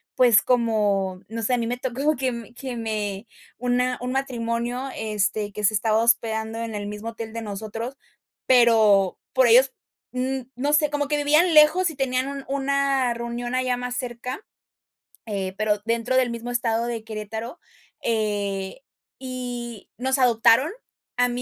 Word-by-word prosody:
pues, 235 -5 +6
como, 205 -6 +1
no 225 +1 -4
sé, 235 - +1
a - - +3
mi 230 - -1
me 245 +1 -2
tocó 265 +5 0
que 260 -1 -1
me 235 -2 -8
que 260 0 -6
me 215 -2 -3 0.3
una 250 +1 0
un 250 0 -3
matrimonio, 245 -1 -2
este, 210 -1 -1
que 210 +1 -6
se 215 +2 +3
estaba 215 +1 +2
hospedando 225 -1 +1
en 230 -1 -4
el 205 0 -4
mismo 210 +2 -5
hotel 225 -1 -7
de 230 - -4
nosotros. 220 +5 -5 0.5
Pero, 220 -6 +5
por 260 0 +5
ellos, 255 +3 +6 0.4
mm, 260 +1 -1
no 285 +4 0
sé, 300 0 +4
como 290 0 -1
que 295 +1 0
vivían 305 +4 +3
lejos 315 +4 +6
y - - -11
tenían 260 -1 0
un 280 -1 -6
una 275 -2 +1
reunión 235 +1 -4
allá 255 -1 0
más 250 0 -4
cerca, 250 - -5 0.8
eh, 195 -3 -3
pero 215 -1 +1
dentro 230 +2 0
del 255 -1 +3
mismo 235 +1 -5
estado 235 -1 0
de 235 -2 -4
Querétaro. 220 - -6 0.4
Eh, 205 -1 -1 0.4
y 245 -4 -6
nos 265 +2 0
adoptaron, 245 +3 +4 0.5
a 245 0 +3
mí 245 0 -3
235 Hz, 165 wpm, -24 LUFS, 220-255 Hz, 0.8 s, pues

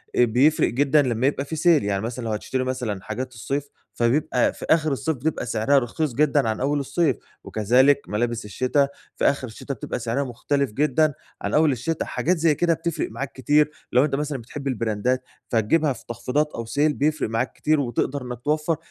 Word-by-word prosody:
آآ 125 - +5
بيفرق 130 +7 +3
جدًا 145 +4 +3
لمّا 125 -1 +1
يبقى 140 -1 -1
في 160 - -5
sale، 160 -1 +4
يعني 100 -1 -1
مثلًا 115 +2 -4
لو 110 - -2
هتشتري 130 +4 -2
مثلًا 125 -6 -3
حاجات 130 +4 -5
الصيف 140 +5 -3 0.2
فبيبقى 125 +1 +1
في - - -8
آخر 155 -1 +3
الصيف، 155 +4 -1
بتبقى 145 0 -2
سعرها 115 +5 +3
رخيص 135 +3 -2
جدًا 140 -2 +2
عن 110 - -2
أول 145 +3 +1
الصيف، 140 +4 +1 0.3
وكذلك 130 +7 +3
ملابس 115 +2 -1
الشتا 130 +7 +1 0.3
في - - -1
آخر 140 -2 +2
الشتا 125 +5 -6
بتبقى 125 - -5
سعرها 120 +4 -1
مختلف 140 +1 -1
جدًا 150 +4 +2 0.3
عن - - -3
أول 155 -1 +4
الشتا، 135 +6 -2
حاجات 180 +2 0
زي 160 -2 +3
كده 170 +1 +2
بتفرق 170 0 -3
معاك 135 0 -5
كتير، 150 +3 +2 0.2
لو 125 +3 +5
أنت 145 - -1
مثلًا 145 -1 -2
بتحب 135 +4 -7
البراندات 125 +1 0 0.3
فتجيبها 135 +7 +2
في 115 - -13
تخفيضات 135 +6 -1
أو 115 - -4
sale 110 - -10 0.2
بيفرق 150 -3 0
معاك 115 +2 -1
كتير، 155 0 +1
وتقدر 135 +2 -1
إنك 125 -2 -6
توفر 150 +3 0
135 Hz, 190 wpm, -24 LUFS, 120-150 Hz, 0.3 s, آآ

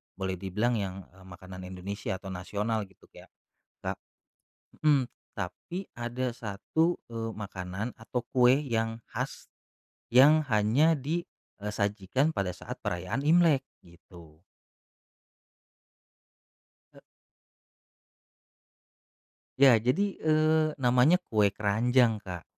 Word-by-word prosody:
boleh 95 -1 -3
dibilang 105 +6 0
yang, 95 -3 -3 0.2
eee, 95 -1 -16
makanan 95 -1 -10
Indonesia 95 +2 -5
atau 95 - -9
nasional 105 +4 -2
gitu, 95 - -23
kayak - - -16 0.5
ka - - 0 0.9
hmm, 140 -5 +4 0.3
tapi 170 - -5
ada 120 +1 -3
1, 125 - -1
eee, 115 -1 -4
makanan 100 +2 -5
atau 120 +2 -4
kue 125 -1 +6
yang 115 -5 -2
khas, - - -5 0.7
yang 150 +5 +7
hanya 115 +8 +3
di, 155 +5 -2 0.4
eee, 105 +1 -4
sajikan 105 +7 0
pada 95 -2 -1
saat - - -8
perayaan 90 +10 -2
Imlek, 160 -4 +5 0.2
gitu. 85 -2 -17 2.5
E - - -14 2.6
Iya, 135 0 +8
jadi, 125 - +2 0.2
eee, 155 0 +4
namanya 125 +6 +4
kue 105 -2 +3
keranjang, 115 +2 +2
Kak. 90 -4 -7
115 Hz, 105 wpm, -29 LUFS, 95-135 Hz, 2.6 s, Iya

